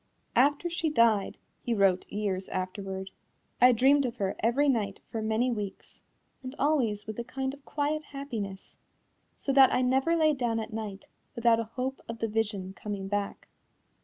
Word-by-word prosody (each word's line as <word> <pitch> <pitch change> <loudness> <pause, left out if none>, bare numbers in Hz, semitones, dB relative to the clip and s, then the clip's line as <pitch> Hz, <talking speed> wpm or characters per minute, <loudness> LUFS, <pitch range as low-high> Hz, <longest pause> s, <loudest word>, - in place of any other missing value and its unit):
"After 285 +6 +3
she 340 -1 -1
died," 230 -8 +3 0.2
he 235 - -1
wrote 195 -3 +2
years 200 -2 -2
afterward, 190 +1 -4 0.5
"I 250 +1 +8
dreamed 270 +4 +4
of 235 - -5
her 195 -1 -1
every 245 +6 +2
night 215 -7 0
for 225 - -2
many 220 +3 +1
weeks, 205 -4 -6 0.4
and 255 +1 -7
always 255 -9 +1
with 215 +1 -6
a - - -2
kind 265 +2 -3
of 280 0 -13
quiet 305 +1 -1
happiness, 225 -9 -6 0.6
so 275 - -1
that 270 -1 +7
I 255 - +2
never 265 +6 +2
lay 310 -2 +4
down 240 -4 -1
at 220 0 -6
night 210 -3 -5 0.3
without 235 -1 +4
a 230 - -1
hope 260 +1 -2
of 230 - -4
the 225 - -1
vision 210 -3 -2
coming 195 -1 -5
back." 205 0 -3
230 Hz, 170 wpm, -29 LUFS, 205-270 Hz, 0.6 s, I